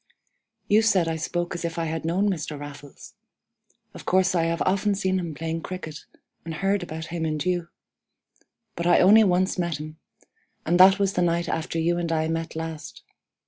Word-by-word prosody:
"You 210 +2 +5
said 195 -6 +3
I 165 - -1
spoke 175 +2 -3
as 175 - -5
if 170 0 -3
I 165 - -1
had 160 0 -4
known 185 +5 +1
Mr. 160 -6 -3
Raffles. 145 -1 -11 0.8
Of - - -10
course 185 0 +2
I 170 -2 +2
have 165 0 0
often 200 +2 +1
seen 190 -1 0
him 170 -4 -5
playing 165 +2 -3
cricket, 155 -4 -7 0.4
and 165 -1 -6
heard 195 +3 0
about 160 -2 -6
him 170 -2 -2
and 155 0 -2
you. 175 -2 0 1.1
But 170 0 -2
I - - +5
only 210 +4 +7
once 185 -1 +1
met 170 -3 -1
him, 155 +1 -9 0.7
and 175 +2 +2
that 190 +1 +8
was 195 -1 +1
the 180 - 0
night 170 0 +1
after 165 +1 -3
you 170 +2 +1
and 170 -1 -2
I 160 -1 +1
met 165 0 -3
last. 160 -2 -7
170 Hz, 190 wpm, -25 LUFS, 160-185 Hz, 1.1 s, that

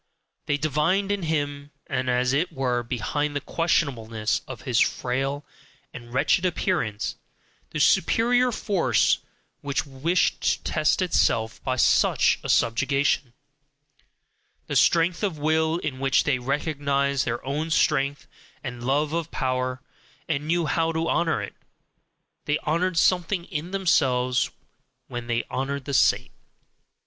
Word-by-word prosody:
They 145 - +1
divined 155 +7 +1
in 205 -1 -1
him 145 -3 -2 0.2
and 130 0 -2
as 125 +1 +1
it 155 +6 +1
were 125 -2 -1
behind 145 +5 -2
the - - +1
questionableness 120 -9 -1
of 130 -4 -8
his 120 -3 +1
frail 135 +3 0 0.5
and 120 -1 -10
wretched 140 +8 +2
appearance 170 - -1 0.5
the 155 - -4
superior 235 - +3
force 180 - +1 0.4
which 140 -1 -2
wished 145 +6 0
to - - 0
test 155 +4 +1
itself 115 -10 +1
by 130 - -1
such 130 - +3
a - - -6
subjugation; 135 +2 +1 1.3
the - - -4
strength 165 0 +3
of 195 -7 -1
will, 160 +2 +1
in 145 -6 -4
which 135 -1 +2
they 140 -3 +1
recognized 140 0 0
their 120 +1 -3
own 150 +4 -2
strength 145 -3 +1 0.4
and 125 -3 -6
love 145 +4 0
of 165 -1 -2
power, 130 0 -2 0.4
and 150 -2 -2
knew 170 0 +1
how 165 +2 +1
to 165 0 -1
honour 165 0 +1
it: - - -7 0.9
they 150 0 +1
honoured 170 +3 0
something 180 +1 +2
in 155 +2 -5
themselves 130 -10 +1 0.6
when 120 -1 -6
they 120 0 0
honoured 135 +1 -3
the 140 - -4
saint. - - +3
145 Hz, 135 wpm, -25 LUFS, 130-165 Hz, 1.3 s, superior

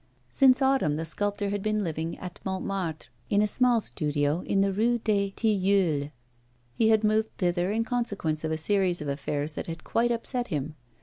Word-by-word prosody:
Since 265 -1 +5
autumn, 265 - +2
the 160 +2 -3
sculptor 205 +4 -1
had 205 -1 -2
been 215 0 0
living 165 -1 -3
at 180 -1 -8
Montmartre, 190 -4 -3 0.2
in 205 - +3
a - - +2
small 245 +2 +3
studio 150 -3 -1
in 195 - +2
the 195 0 +1
Rue 235 +4 +2
des 205 -3 0
Tilleuls. 195 -8 +1 0.6
He 220 - +2
had 220 -1 +4
moved 215 +1 +2
thither 175 +1 0
in 225 +2 +1
consequence 205 -11 -2
of 160 - -2
a 160 - 0
series 180 -1 +1
of - - -6
affairs 145 +2 -2
that - - -5
had 165 -1 -6
quite 235 +1 +1
upset 240 +1 -2
him. 150 0 -3
195 Hz, 185 wpm, -27 LUFS, 160-220 Hz, 0.6 s, Since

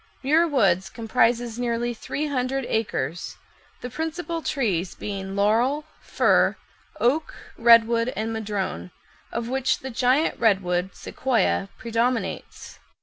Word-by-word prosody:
Muir 315 +5 +4
Woods 195 - +2
comprises 235 0 0
nearly 240 0 -1
three 285 +6 -4
hundred 270 -2 -1
acres, 175 -7 -2 0.4
the 250 - -5
principal 325 +3 -3
trees 195 - -1
being 195 -1 -5
laurel, 235 +9 +2 0.2
fir, - - +3 0.4
oak, 285 +7 +1 0.2
redwood, 230 0 +5
and 220 +1 -2
madrone, 205 -4 -3 0.4
of 235 0 -3
which 265 +1 +1
the 265 - -6
giant 255 +6 +1
redwood 190 -4 +1
(Sequoia) 230 -6 0
predominates. 235 +1 -2
235 Hz, 110 wpm, -24 LUFS, 210-265 Hz, 0.4 s, redwood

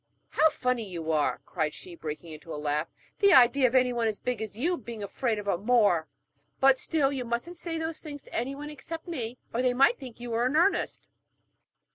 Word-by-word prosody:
'How 315 - +4
funny 250 -7 -1
you 165 -3 -3
are,' 150 -2 +1
cried 155 -4 -2
she, 180 - -9
breaking 160 0 -7
into 155 +2 -10
a - - -4
laugh. 150 +1 -1 0.3
'The 400 -2 +6
idea 255 -1 +6
of 245 - -2
anyone 245 -3 +3
as 215 -2 -1
big 250 -3 -2
as 215 -1 -5
you 340 +9 +1
being 235 -6 -7
afraid 225 +2 -1
of 205 -1 -6
a 180 -4 +1
Moor! 205 -7 +3 0.5
But 270 -1 +5
still, 285 -3 +1
you 260 -2 -2
mustn't 240 +9 -3
say 335 -1 -4
those 320 0 -3
things 290 -3 -8
to - - -17
anyone 275 +5 -3
except 325 +4 -7
me, 250 -8 -4 0.2
or 235 - +1
they 250 -1 +2
might 275 - +4
think 250 -3 -10
you 240 0 -6
were 235 +2 +2
in 270 - -1
earnest.' 350 +5 +1
245 Hz, 210 wpm, -28 LUFS, 205-280 Hz, 0.5 s, The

